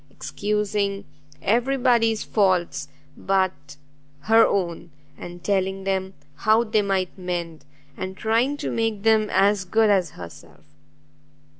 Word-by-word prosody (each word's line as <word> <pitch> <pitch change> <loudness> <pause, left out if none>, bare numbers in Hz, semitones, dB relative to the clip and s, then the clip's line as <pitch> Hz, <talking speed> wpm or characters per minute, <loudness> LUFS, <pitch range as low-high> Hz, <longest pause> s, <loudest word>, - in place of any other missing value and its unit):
excusing 205 -1 -2 0.4
every 245 +5 +1
body's 235 -4 +2
faults 180 -9 0 0.3
but 180 -8 -2 0.4
her 225 +7 +5
own, 175 -3 -2 0.3
and 175 +2 -10
telling 195 -1 -1
them 190 0 -2 0.2
how 220 +6 +3
they 215 -2 +1
might 195 -2 -1
mend, 170 -4 -5 0.3
and 190 +1 -6
trying 235 +6 +1
to - - -4
make 225 -3 -1
them 220 -1 +3
as 200 0 +2
good 220 +3 +2
as 185 -4 +2
herself! 85 -3 -12
195 Hz, 120 wpm, -23 LUFS, 180-220 Hz, 0.4 s, her